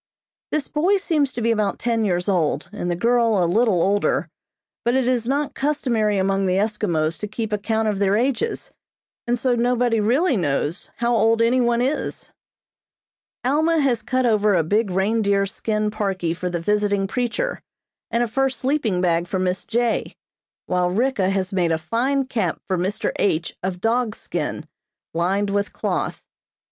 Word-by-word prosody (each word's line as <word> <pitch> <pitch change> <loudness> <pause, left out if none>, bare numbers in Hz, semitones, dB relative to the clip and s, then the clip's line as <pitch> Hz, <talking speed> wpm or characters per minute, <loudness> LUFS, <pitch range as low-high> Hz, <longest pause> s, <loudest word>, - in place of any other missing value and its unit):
This 305 -3 -1
boy 360 +7 +2
seems 310 -8 0
to 235 - -4
be 230 - +3
about 210 -3 0
ten 230 -2 0
years 180 -3 0
old, 165 -5 0
and 175 - -3
the 175 - 0
girl 230 -1 +2
a - - +3
little 205 +1 +2
older, 200 +1 +1 0.5
but 240 +1 +1
it 260 -2 +2
is 245 -2 +1
not 280 +2 0
customary 245 -8 0
among 195 0 +1
the 185 - +1
Eskimos 195 -7 0
to 210 - -4
keep 215 +1 -4
account 220 +1 0
of 205 -2 -1
their 200 0 +2
ages, 270 - -1 0.6
and 240 +1 +1
so 250 +1 +1
nobody 240 -1 +2
really 260 - +2
knows 150 +1 -1
how 240 0 +1
old 225 +1 +3
any 235 +3 +3
one 240 0 +2
is. 275 +4 -3 1.1
Alma 315 +5 +2
has 255 -6 +1
cut 255 +3 0
over 210 -3 +3
a 165 - +3
big 205 +6 +1
reindeer 200 +1 +1
skin 215 +1 -2
parkie 195 -6 -2
for 180 +1 -3
the 175 -1 -2
visiting 205 +2 +1
preacher, 250 - -2 0.5
and 235 +1 +1
a - - 0
fur 270 +4 +1
sleeping 260 -8 -1
bag 170 -1 +1
for 190 - -2
Miss 185 0 -1
J., 235 0 -1 0.5
while 180 -1 +1
Ricka 210 -1 +1
has 195 -1 -1
made 175 -3 +1
a 160 - +2
fine 255 - 0
cap 215 -10 -2
for 190 - 0
Mr. 185 +4 -1
H. 170 -4 0
of 180 -1 -3
dog's 230 -1 0
skin, - - -4 0.5
lined 195 +5 0
with 200 0 -1
cloth. - - -2
215 Hz, 170 wpm, -22 LUFS, 190-245 Hz, 1.1 s, be